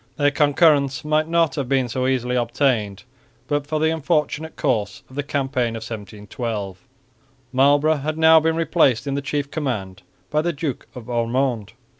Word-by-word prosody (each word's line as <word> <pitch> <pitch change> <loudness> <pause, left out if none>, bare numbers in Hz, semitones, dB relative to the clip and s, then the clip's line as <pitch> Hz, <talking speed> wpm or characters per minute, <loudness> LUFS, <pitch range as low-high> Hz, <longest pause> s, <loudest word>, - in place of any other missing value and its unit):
Their 145 -1 +3
concurrence 145 -1 +3
might 155 +1 +1
not 165 -3 +2
have 135 -4 -2
been 135 -2 +2
so 130 +2 -1
easily 125 -1 0
obtained, 120 -4 0 0.4
but 145 0 -1
for 155 0 -1
the 160 +1 +2
unfortunate 160 0 -1
course 110 - -1
of - - -13
the 145 - -1
campaign 135 -4 -1
of 110 - -6
1712. 105 -2 -6 0.7
Marlborough 145 +4 +3
had 155 +3 -3
now 160 0 +7
been 160 +1 0
replaced 160 -7 +2
in 140 - -2
the 140 - -1
chief 140 0 -3
command 105 - -4 0.3
by 150 - +2
the 170 +2 -1
Duke 145 -4 -4
of 125 -3 -9
Ormonde. 120 -2 -1
140 Hz, 165 wpm, -22 LUFS, 120-155 Hz, 0.7 s, now